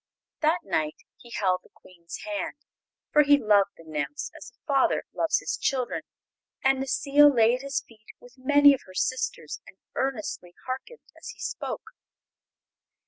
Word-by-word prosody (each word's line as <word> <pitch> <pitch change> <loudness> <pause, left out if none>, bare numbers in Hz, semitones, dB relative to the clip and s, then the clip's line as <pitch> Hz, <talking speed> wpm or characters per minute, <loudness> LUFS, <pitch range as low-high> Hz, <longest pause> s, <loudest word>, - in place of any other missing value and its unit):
That 320 +3 +3
night 155 -5 -1 0.2
he 240 - -15
held 185 -5 0
the - - -22
Queen's 170 -2 -11
hand, 205 -2 -3 0.6
for 300 - +7
he 285 0 +6
loved 205 -5 +3
the 165 - -14
nymphs 155 - -4
as - - -10
a - - -37
father 275 -4 +2
loves 325 -1 +2
his - - -2
children; 255 -3 -1 0.6
and 265 0 +4
Necile 285 +2 +5
lay 230 -3 +4
at 250 - -2
his 275 0 -2
feet 215 -2 -21
with 245 0 -16
many 285 +2 +6
of 270 - -3
her 185 - -13
sisters 260 +6 -2
and - - -15 0.2
earnestly 215 -9 -3
harkened 345 - -6
as - - -10
he - - -10
spoke. - - -5
255 Hz, 160 wpm, -27 LUFS, 200-285 Hz, 0.6 s, for